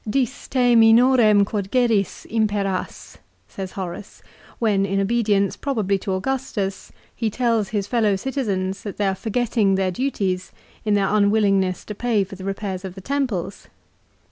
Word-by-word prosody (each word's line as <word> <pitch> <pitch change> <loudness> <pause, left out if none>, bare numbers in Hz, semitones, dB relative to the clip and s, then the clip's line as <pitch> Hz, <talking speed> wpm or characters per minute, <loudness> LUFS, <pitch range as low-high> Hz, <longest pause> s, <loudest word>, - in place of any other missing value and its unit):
" - - -7
Dis 265 0 -2
te 245 -2 +3
minorem 225 -2 +6
quod 200 -2 -3
geris, 230 -5 +1
imperas," 205 -4 -2 0.3
says 190 -1 -7
Horace, 185 +1 -7 0.3
when, 210 -4 +1
in 195 0 0
obedience 205 -1 +1
probably 210 -8 -1
to 190 - -3
Augustus, 205 -2 -3 0.2
he 225 -2 -1
tells 230 -3 0
his 205 -2 -1
fellow 215 -2 +1
citizens 195 -6 -2
that 205 - -7
they 205 - 0
are 190 - +1
forgetting 220 -1 0
their 190 -1 0
duties 195 -6 -2 0.3
in 210 -1 +2
their 200 0 +1
unwillingness 200 -3 +2
to 210 - -6
pay 220 -1 +1
for 195 +1 -9
the 190 - -10
repairs 195 -1 -4
of 190 -1 -7
the 190 - -9
temples. 225 -8 -3
205 Hz, 155 wpm, -22 LUFS, 195-230 Hz, 0.3 s, minorem